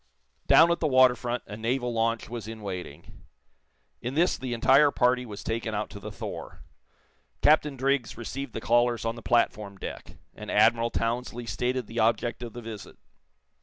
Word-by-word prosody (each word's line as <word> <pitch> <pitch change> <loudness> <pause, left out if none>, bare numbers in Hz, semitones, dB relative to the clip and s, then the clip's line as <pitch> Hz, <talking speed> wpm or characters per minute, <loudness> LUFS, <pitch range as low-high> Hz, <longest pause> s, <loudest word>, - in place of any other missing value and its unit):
Down 165 +1 +7
at 170 - 0
the 160 - +1
water 130 -2 +5
front 120 0 -4
a 105 - -8
naval 120 +2 -1
launch 115 0 0
was 115 -3 -7
in 110 -1 -8
waiting. 90 -7 -8 0.8
In 125 +3 -4
this 170 +4 +3
the 125 -2 -4
entire 135 +5 +5
party 125 -2 +1
was 105 -2 -8
taken 115 -1 -3
out 105 +1 -3
to 100 - -9
the - - -8
"Thor." - - -8 0.8
Captain 150 -2 +4
Driggs 135 -3 0
received 125 +2 -6
the 115 - -5
callers 120 -1 +2
on 115 - 0
the 120 - -9
platform 105 -4 0
deck, - - -8 0.2
and 105 - -9
Admiral 115 +2 +4
Townsley 120 +1 -2
stated 125 +1 -2
the 115 +2 -5
object 115 +2 +1
of 120 -3 -7
the 120 - -8
visit. 110 -2 -9
120 Hz, 175 wpm, -27 LUFS, 110-125 Hz, 0.8 s, Down